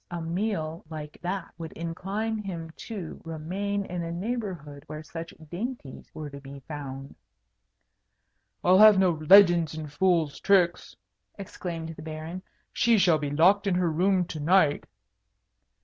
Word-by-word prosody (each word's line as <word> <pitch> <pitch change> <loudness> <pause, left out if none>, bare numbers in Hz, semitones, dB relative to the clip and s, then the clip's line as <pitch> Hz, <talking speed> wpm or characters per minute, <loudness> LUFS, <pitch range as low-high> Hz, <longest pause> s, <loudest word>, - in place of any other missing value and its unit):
A 175 -1 -4
meal 165 -1 -3
like 150 -2 -8
that 180 0 -4
would 165 -1 -7
incline 195 +7 -3
him 170 -6 -6 0.2
to 195 -8 -6
remain 190 +6 -3
in 180 -2 -4
a 165 0 -4
neighbourhood 175 - -4
where 155 0 -7
such 165 +1 -7 0.2
dainties 185 - -6
were 155 -1 -7
to 140 -1 -10
be 140 0 -10
found." 135 -1 -7 1.5
"I'll 185 +2 +5
have 215 -1 +9
no 190 -2 +4
legends 170 0 +5
and 155 -2 -7
fool's 170 -4 +1
tricks," 180 -3 +2 0.4
exclaimed 170 -4 -6
the 160 -1 -9
Baron. 160 +3 -6 0.3
"She 235 -1 +3
shall 175 -5 +4
be 145 -1 -3
locked 185 +8 +4
in 190 - +2
her 180 -2 +1
room 185 +3 +2
to 165 -3 -7
night." 155 -1 +3
170 Hz, 145 wpm, -27 LUFS, 155-190 Hz, 1.5 s, have